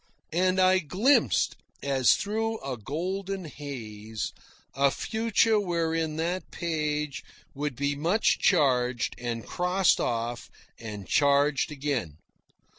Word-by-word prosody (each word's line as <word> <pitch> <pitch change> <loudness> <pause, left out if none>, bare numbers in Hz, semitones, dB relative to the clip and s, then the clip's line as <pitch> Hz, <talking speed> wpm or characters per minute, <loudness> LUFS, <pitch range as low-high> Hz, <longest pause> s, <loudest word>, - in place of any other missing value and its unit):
And 185 +2 +2
I 185 0 +5
glimpsed, 185 - +2 0.3
as 135 -3 +4
through 225 +2 -2
a 135 -1 -4
golden 185 - -4
haze, 110 -8 -6 0.4
a 140 +1 +3
future 220 - +1
wherein 165 -4 -1
that 170 +4 -2
page 150 -3 -2 0.3
would 145 -1 -3
be 140 +2 -1
much 170 +9 +2
charged, 125 - +2
and 120 -2 -4
crossed 180 +1 +2
off, 120 0 -2 0.3
and 105 -4 -7
charged 145 +1 +3
again. 135 - -3
150 Hz, 110 wpm, -27 LUFS, 130-185 Hz, 0.4 s, I